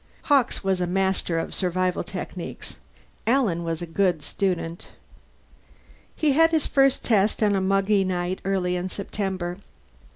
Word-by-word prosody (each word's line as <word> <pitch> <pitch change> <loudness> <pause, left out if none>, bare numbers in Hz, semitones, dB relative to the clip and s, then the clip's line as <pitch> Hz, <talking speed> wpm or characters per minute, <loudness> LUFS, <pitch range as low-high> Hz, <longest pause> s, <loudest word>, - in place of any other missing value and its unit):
Hawkes 275 -7 +2
was 190 -1 0
a 180 - 0
master 190 -2 0
of 165 - -3
survival 185 0 0
techniques; - - -7 0.5
Alan 225 -9 +2
was 165 0 -3
a - - -3
good 170 -2 0
student. 175 -3 -2 1.3
He 305 -2 +2
had 325 +4 +5
his 320 -2 +1
first 275 -1 +3
test 215 -1 +2
on 205 -1 +3
a 195 - +1
muggy 195 +1 +2
night 180 0 -2
early 185 -2 0
in 180 +1 -3
September. 190 -2 -4
190 Hz, 140 wpm, -24 LUFS, 180-210 Hz, 1.3 s, had